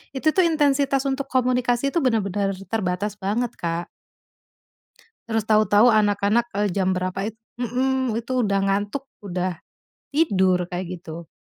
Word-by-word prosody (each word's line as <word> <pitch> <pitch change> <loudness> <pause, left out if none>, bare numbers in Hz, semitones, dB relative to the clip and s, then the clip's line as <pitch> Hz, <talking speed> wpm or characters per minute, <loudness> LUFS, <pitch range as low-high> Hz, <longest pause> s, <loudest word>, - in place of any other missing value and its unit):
itu 265 +4 -2
tuh, 375 - +5
intensitas 280 -4 +2
untuk 270 0 -3
komunikasi 250 0 +1
itu 315 +3 0
benar-benar 205 -5 +1 0.2
terbatas 200 0 -2
banget, 215 +5 -2
Kak. 170 0 -3 1.4
Terus 225 -1 0
tahu-tahu 215 +1 +5
anak-anak, 210 +2 +2
eee, 205 0 +2
jam 190 -1 +1
berapa 185 +2 -2
it 220 - -16 0.2
mhm, 255 0 0
itu 250 +2 -1
udah 200 -3 +1
ngantuk, 205 +7 -1 0.2
udah 185 -3 -3 0.5
tidur, 190 - +2
kayak 180 0 -5
gitu. 165 -1 -9
215 Hz, 130 wpm, -23 LUFS, 190-255 Hz, 1.4 s, tuh